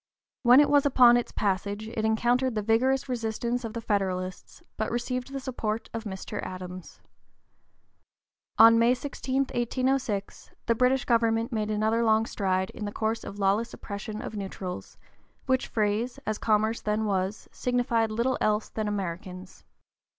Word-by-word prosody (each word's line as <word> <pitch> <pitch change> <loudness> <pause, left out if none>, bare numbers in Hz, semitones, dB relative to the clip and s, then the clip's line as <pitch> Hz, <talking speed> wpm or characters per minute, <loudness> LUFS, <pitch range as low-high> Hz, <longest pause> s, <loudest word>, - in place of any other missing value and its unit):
When 245 +1 +7
it 295 - +6
was 285 -1 +5
upon 250 -4 +6
its 240 - 0
passage 205 +2 -2
it 225 -1 -3
encountered 240 +3 +1
the 215 - -1
vigorous 255 +6 +2
resistance 235 0 -2
of 225 -2 -5
the 230 - -3
Federalists, 185 -4 -3
but 220 - -2
received 250 +2 -3
the 275 - -4
support 230 -4 -4
of 225 0 -5
Mr. 190 -2 -5
Adams. 185 -1 -8 1.6
On 230 +1 +8
May 235 +2 +4
16, 260 0 -5 0.2
1806, 240 -4 -1 0.2
the 230 - +3
British 250 +2 +2
government 230 -1 +2
made 215 -2 -1
another 220 +2 +1
long 220 0 +3
stride 190 -3 -1
in 210 - -6
the 205 - -4
course 220 +1 -2
of 200 - -8
lawless 205 +3 +1
oppression 210 +1 -6
of - - -6
neutrals, 190 -2 -6 0.5
which 260 -1 +1
phrase, 220 +3 -1
as 215 -1 -2
commerce 220 +1 +1
then 215 +1 0
was, 195 0 -2
signified 240 -2 0
little 235 +4 0
else 210 0 +1
than 215 -1 -3
Americans. 185 -1 -5
220 Hz, 150 wpm, -27 LUFS, 205-240 Hz, 1.6 s, On